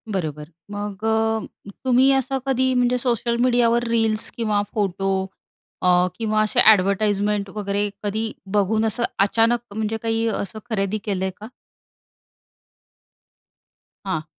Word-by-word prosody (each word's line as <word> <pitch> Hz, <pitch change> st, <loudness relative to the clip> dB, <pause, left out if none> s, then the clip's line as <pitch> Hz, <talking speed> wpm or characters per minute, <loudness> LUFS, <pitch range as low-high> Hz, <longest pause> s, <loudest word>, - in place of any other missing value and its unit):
बरोबर 155 Hz, -3 st, -4 dB, 0.2 s
मग 205 Hz, 0 st, -5 dB
अ, 220 Hz, -2 st, -1 dB, 0.2 s
तुम्ही 260 Hz, +2 st, +5 dB
असं 270 Hz, 0 st, 0 dB
कधी 260 Hz, -1 st, +1 dB
म्हणजे 250 Hz, 0 st, +2 dB
सोशल 240 Hz, -1 st, 0 dB
मीडियावर 240 Hz, -1 st, +3 dB
रील्स 225 Hz, -1 st, +1 dB
किंवा 210 Hz, -3 st, +1 dB
फोटो 195 Hz, -2 st, -1 dB, 0.7 s
अ, 180 Hz, 0 st, +4 dB
किंवा 215 Hz, -1 st, +1 dB
असे 215 Hz, -, +1 dB
एडव्हर्टाइजमेंट 200 Hz, +1 st, 0 dB
वगैरे 205 Hz, 0 st, -1 dB
कधी 220 Hz, +2 st, -2 dB, 0.3 s
बघून 215 Hz, +2 st, +2 dB
असं 225 Hz, +2 st, 0 dB, 0.2 s
अचानक 230 Hz, +3 st, +2 dB, 0.2 s
म्हणजे 220 Hz, 0 st, -1 dB
काही 225 Hz, 0 st, 0 dB
असं 215 Hz, 0 st, -3 dB
खरेदी 200 Hz, -1 st, -1 dB
केलंय 190 Hz, -2 st, -1 dB
का? 215 Hz, -, -8 dB, 2.6 s
हां. 160 Hz, -5 st, -2 dB
215 Hz, 115 wpm, -22 LUFS, 200-230 Hz, 2.6 s, तुम्ही